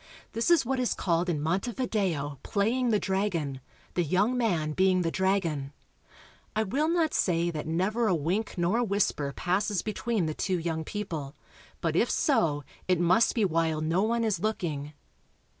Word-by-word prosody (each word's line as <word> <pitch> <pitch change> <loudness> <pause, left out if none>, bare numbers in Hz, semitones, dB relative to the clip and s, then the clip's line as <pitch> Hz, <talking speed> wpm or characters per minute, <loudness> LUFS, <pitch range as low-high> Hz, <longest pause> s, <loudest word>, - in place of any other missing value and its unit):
This 230 +6 0
is 340 -6 +5
what 265 +2 0
is 250 - 0
called 175 0 0
in 160 -4 0
Montevideo 180 - -1
''playing 235 +5 +1
the 215 -2 +3
dragon," 180 -10 -1 0.3
the 175 - +1
young 195 - +2
man 175 -11 0
being 185 +2 +3
the 165 - 0
dragon. 170 -8 0 0.8
I 220 - +2
will 275 +10 0
not 335 -2 +1
say 170 -1 +1
that 155 -2 -5
never 200 +8 +1
a 185 - +3
wink 180 +8 -1
nor 175 +7 +2
a - - +2
whisper 200 -9 0
passes 190 +5 0
between 215 -2 -1
the 155 - -2
two 185 +3 -1
young 160 -1 -2
people, 160 -7 -5 0.5
but - - 0
if - - +3
so 160 - +2 0.2
it 180 -2 +2
must 180 +7 +3
be 220 -4 +3
while 165 -3 +1
no 165 +4 +1
one 230 +2 +1
is 210 -6 0
looking. 155 -8 -2
185 Hz, 170 wpm, -28 LUFS, 160-220 Hz, 0.8 s, is